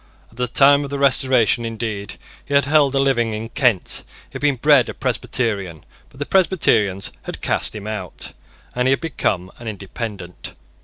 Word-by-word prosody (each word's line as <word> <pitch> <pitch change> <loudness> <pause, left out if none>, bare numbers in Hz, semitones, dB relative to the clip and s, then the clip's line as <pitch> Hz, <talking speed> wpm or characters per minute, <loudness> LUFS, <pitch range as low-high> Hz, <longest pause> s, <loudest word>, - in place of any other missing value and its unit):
At 115 - -21
the 125 0 0
time 140 +3 +5
of 140 - -6
the 140 - -3
Restoration, 130 -4 +3
indeed, 110 -3 -4 0.3
he 140 - -3
had 140 - +4
held 145 -2 +3
a - - +3
living 120 -5 +1
in 110 +1 -6
Kent. 120 -7 +1 0.3
He - - -26
had - - -6
been 145 -2 +2
bred 140 0 +4
a - - -6
Presbyterian; 110 - -2 0.2
but - - -19
the 145 - -3
Presbyterians 110 - +2
had - - -6
cast - - -1
him 105 -1 -7
out, 105 -4 -6 0.4
and 125 +1 0
he 130 - +4
had - - 0
become 95 - -2
an 120 - -9
Independent. 100 -3 -7
120 Hz, 185 wpm, -20 LUFS, 105-140 Hz, 0.4 s, time